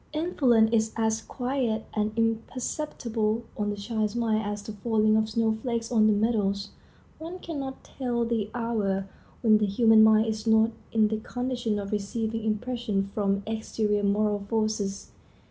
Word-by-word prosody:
Influence 260 Hz, -9 st, +3 dB
is 220 Hz, -1 st, +2 dB
as 220 Hz, -1 st, 0 dB
quiet 245 Hz, -2 st, -2 dB
and 210 Hz, 0 st, 0 dB
imperceptible 230 Hz, -1 st, -1 dB
on 205 Hz, 0 st, -1 dB
the 205 Hz, -, -2 dB
child's 215 Hz, +1 st, -2 dB
mind 225 Hz, -2 st, +1 dB
as 205 Hz, 0 st, -4 dB
the 215 Hz, -, -6 dB
falling 215 Hz, 0 st, +2 dB
of 220 Hz, 0 st, +2 dB
snowflakes 230 Hz, +1 st, -1 dB
on 215 Hz, -3 st, +4 dB
the -, -, +5 dB
meadows. 205 Hz, -2 st, 0 dB, 0.5 s
One 335 Hz, +3 st, -6 dB
can 330 Hz, -5 st, -6 dB
not 265 Hz, -1 st, -6 dB
tell 240 Hz, -3 st, -2 dB
the 225 Hz, -3 st, -1 dB
hour 205 Hz, -5 st, -1 dB, 0.4 s
when 215 Hz, -2 st, +5 dB
the 210 Hz, -, +1 dB
human 220 Hz, +2 st, +5 dB
mind 220 Hz, 0 st, +6 dB
is 220 Hz, 0 st, -3 dB
not 220 Hz, 0 st, +4 dB, 0.2 s
in 215 Hz, -1 st, +3 dB
the 220 Hz, -, -1 dB
condition 245 Hz, -2 st, -2 dB
of 200 Hz, -1 st, -5 dB
receiving 220 Hz, +2 st, -2 dB
impressions 215 Hz, -3 st, -1 dB
from 200 Hz, -1 st, 0 dB
exterior 220 Hz, -1 st, -1 dB
moral 205 Hz, +1 st, +1 dB
forces. 215 Hz, -3 st, -1 dB
220 Hz, 155 wpm, -27 LUFS, 210-235 Hz, 0.5 s, mind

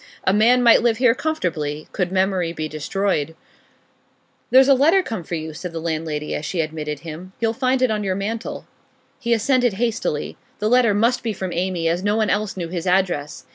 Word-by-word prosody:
A 190 Hz, -, +2 dB
man 240 Hz, +4 st, +4 dB
might 235 Hz, -1 st, +6 dB
live 230 Hz, -2 st, +2 dB
here 245 Hz, -1 st, +4 dB
comfortably 160 Hz, -, -3 dB
could 180 Hz, -3 st, -2 dB
memory 185 Hz, -3 st, 0 dB
be 155 Hz, -2 st, -4 dB
destroyed. 160 Hz, +1 st, -2 dB, 1.1 s
'There's 265 Hz, +1 st, +6 dB
a 275 Hz, -, +7 dB
letter 320 Hz, +9 st, +4 dB
come 220 Hz, -, -5 dB
for 170 Hz, -, -4 dB
you,' 160 Hz, 0 st, -5 dB
said 175 Hz, +2 st, -7 dB
the 165 Hz, -, -4 dB
landlady 155 Hz, -2 st, -3 dB
as -, -, -3 dB
she 170 Hz, +3 st, -3 dB
admitted 155 Hz, -2 st, -3 dB
him. 170 Hz, +3 st, -9 dB
'You'll 225 Hz, -1 st, +1 dB
find 255 Hz, +1 st, +1 dB
it 255 Hz, -, +3 dB
on 210 Hz, -1 st, -1 dB
your 190 Hz, -2 st, -1 dB
mantel.' 220 Hz, +4 st, -4 dB, 0.5 s
He 235 Hz, -3 st, -3 dB
ascended 245 Hz, +1 st, +2 dB
hastily. 220 Hz, -8 st, -2 dB, 0.2 s
The 210 Hz, +1 st, -1 dB
letter 240 Hz, -4 st, +4 dB
must 235 Hz, +4 st, +2 dB
be 225 Hz, -2 st, -2 dB
from 190 Hz, -2 st, -5 dB
Amy, 175 Hz, -1 st, -1 dB
as 170 Hz, +3 st, 0 dB
no 205 Hz, +1 st, +1 dB
one 220 Hz, -1 st, +1 dB
else 205 Hz, -1 st, -1 dB
knew 170 Hz, -2 st, -4 dB
his 175 Hz, 0 st, -4 dB
address. 180 Hz, -6 st, 0 dB
190 Hz, 200 wpm, -21 LUFS, 165-230 Hz, 1.1 s, a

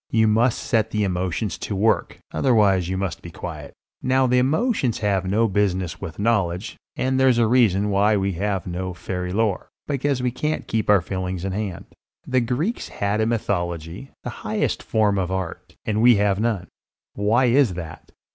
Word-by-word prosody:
You 110 Hz, -1 st, +3 dB
must 115 Hz, +3 st, +3 dB
set 110 Hz, -3 st, 0 dB
the 105 Hz, -1 st, 0 dB
emotions 90 Hz, +1 st, -2 dB
to 100 Hz, -, -4 dB
work; 110 Hz, +4 st, +1 dB
otherwise 100 Hz, -8 st, +3 dB
you 95 Hz, -, -1 dB
must 95 Hz, -3 st, -3 dB
be 85 Hz, -, -9 dB
quiet. 80 Hz, -4 st, -8 dB, 0.3 s
Now 130 Hz, +1 st, +2 dB
the 125 Hz, 0 st, +3 dB
emotions 140 Hz, -, +1 dB
have 100 Hz, -3 st, 0 dB
no 110 Hz, +4 st, +3 dB
business 95 Hz, -4 st, -1 dB
with 80 Hz, -, -6 dB
knowledge; 100 Hz, -4 st, 0 dB, 0.2 s
and 130 Hz, 0 st, 0 dB
there's 130 Hz, -2 st, +4 dB
a 120 Hz, -, +4 dB
reason 105 Hz, -4 st, +3 dB
why 105 Hz, +2 st, +3 dB
we 100 Hz, 0 st, 0 dB
have 95 Hz, +1 st, -2 dB
no 90 Hz, 0 st, -4 dB
fairy 90 Hz, 0 st, -4 dB
lore, 105 Hz, -1 st, 0 dB, 0.2 s
because 140 Hz, -2 st, -1 dB
we 125 Hz, -, +1 dB
can't 150 Hz, +5 st, -2 dB
keep 110 Hz, -2 st, -1 dB
our 100 Hz, -3 st, +6 dB
feelings 95 Hz, 0 st, -4 dB
in 95 Hz, -, -2 dB
hand. 100 Hz, -3 st, -4 dB, 0.4 s
The 130 Hz, -1 st, +1 dB
Greeks 140 Hz, -, -2 dB
had 100 Hz, +2 st, -1 dB
a 110 Hz, -, +2 dB
mythology, 90 Hz, -, -2 dB
the -, -, -4 dB
highest -, -, -1 dB
form 105 Hz, -3 st, +1 dB
of 90 Hz, -1 st, -1 dB
Art, 95 Hz, -3 st, -5 dB
and 110 Hz, 0 st, 0 dB
we 120 Hz, 0 st, +7 dB
have 100 Hz, -1 st, +2 dB
none. 110 Hz, -5 st, 0 dB, 0.5 s
Why 110 Hz, +5 st, +2 dB
is 125 Hz, -5 st, +3 dB
that? 80 Hz, -3 st, -8 dB
105 Hz, 180 wpm, -23 LUFS, 95-120 Hz, 0.5 s, we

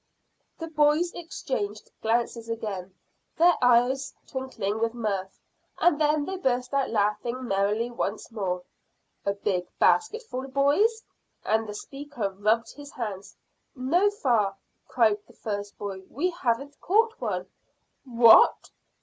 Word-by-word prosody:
The 330 Hz, -, -5 dB
boys 310 Hz, +2 st, +2 dB
exchanged 215 Hz, -11 st, -5 dB
glances 230 Hz, 0 st, -1 dB
again, 195 Hz, -5 st, -5 dB, 0.4 s
their 345 Hz, +2 st, +6 dB
eyes 250 Hz, +2 st, +3 dB
twinkling 240 Hz, -6 st, -3 dB
with 230 Hz, +1 st, 0 dB
mirth, 200 Hz, -5 st, -3 dB, 0.4 s
and 315 Hz, -3 st, +3 dB
then 300 Hz, -1 st, +2 dB
they 380 Hz, +3 st, -4 dB
burst 250 Hz, -5 st, -1 dB
out 275 Hz, -1 st, +1 dB
laughing 230 Hz, +4 st, -1 dB
merrily 205 Hz, +4 st, 0 dB
once 220 Hz, -1 st, -3 dB
more. 185 Hz, -5 st, -2 dB, 0.6 s
"A 200 Hz, -, +2 dB
big 190 Hz, -3 st, -1 dB
basketful, 440 Hz, -, +1 dB
boys?" 295 Hz, -, +2 dB, 0.4 s
And 220 Hz, 0 st, +1 dB
the 210 Hz, -, -6 dB
speaker 275 Hz, -4 st, -5 dB
rubbed 215 Hz, +4 st, +1 dB
his 290 Hz, -1 st, -11 dB
hands. 205 Hz, -5 st, -6 dB, 0.4 s
"No, 330 Hz, +11 st, +2 dB
fa," 235 Hz, -, +1 dB, 0.3 s
cried 220 Hz, -4 st, +3 dB
the -, -, -18 dB
first 205 Hz, -1 st, -5 dB
boy. 195 Hz, -2 st, -5 dB
"We 350 Hz, +8 st, -1 dB
haven't 280 Hz, -3 st, -2 dB
caught 445 Hz, +4 st, +2 dB
one." 185 Hz, -6 st, -2 dB, 0.6 s
"What! 235 Hz, -4 st, +6 dB
240 Hz, 125 wpm, -26 LUFS, 210-290 Hz, 0.6 s, their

